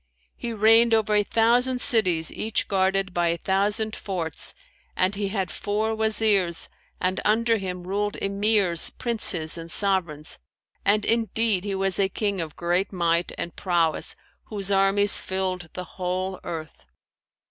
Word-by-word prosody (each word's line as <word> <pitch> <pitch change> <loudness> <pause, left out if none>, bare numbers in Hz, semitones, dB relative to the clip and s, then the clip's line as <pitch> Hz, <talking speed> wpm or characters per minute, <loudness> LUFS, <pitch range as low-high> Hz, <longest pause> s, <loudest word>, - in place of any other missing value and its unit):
He 235 - -6
reigned 225 +1 +5
over 215 -1 0
a 210 - +4
thousand 240 +4 +2
cities 185 - +3
each 220 0 -2
guarded 190 -1 0
by 175 -1 +1
a 170 0 0
thousand 205 +4 0
forts 170 -6 -2 0.4
and 185 +2 +1
he 200 0 -2
had 195 -2 -3
four 215 +2 -2
Wazirs 215 -5 +2 0.3
and 185 +1 -1
under 230 +2 +2
him 180 -3 -5
ruled 205 +3 -2
Emirs, 200 -3 +2
Princes 180 -9 +1
and 165 0 -9
Sovereigns; 170 -6 0 0.4
and 210 +1 +2
indeed 225 -3 +1
he 200 -1 -2
was 195 -1 0
a 195 -1 +2
King 200 -2 -2
of 155 -2 -6
great 175 +3 -1
might 170 -2 0
and 170 - -5
prowess 170 -4 0 0.3
whose 200 -2 -3
armies 195 +1 +3
filled 185 -3 -3
the 180 - -5
whole 185 +1 -4
earth. 155 - -8
195 Hz, 145 wpm, -24 LUFS, 180-215 Hz, 0.4 s, reigned